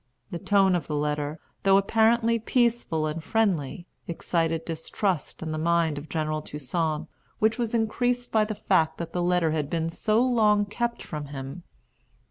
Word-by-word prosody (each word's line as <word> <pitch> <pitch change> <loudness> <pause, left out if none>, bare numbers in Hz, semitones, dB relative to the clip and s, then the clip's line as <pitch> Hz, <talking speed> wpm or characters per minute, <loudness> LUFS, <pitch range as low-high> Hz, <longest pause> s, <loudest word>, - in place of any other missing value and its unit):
The 170 - -4
tone 195 0 +3
of 175 - -2
the 150 - -2
letter, 150 +1 -1 0.2
though 195 0 +5
apparently 230 +3 +3
peaceful 230 -9 +1
and 155 +1 -3
friendly, 175 -7 0 0.2
excited 165 -1 -1
distrust 165 +2 -2
in 160 - -3
the 155 - -2
mind 165 -2 +1
of 150 - -12
General 155 -1 -1
Toussaint, 150 +2 -2 0.3
which 220 +3 +2
was 235 -1 -1
increased 245 +2 0
by 220 -1 +4
the 215 0 -4
fact 160 -5 +1
that 170 -1 -6
the 180 - 0
letter 175 -2 +2
had 150 -2 -1
been 165 0 -1
so 215 +6 +1
long 210 -4 +3
kept 235 +3 -3
from 150 -2 -6
him. 135 +4 -7
170 Hz, 165 wpm, -26 LUFS, 155-215 Hz, 0.3 s, though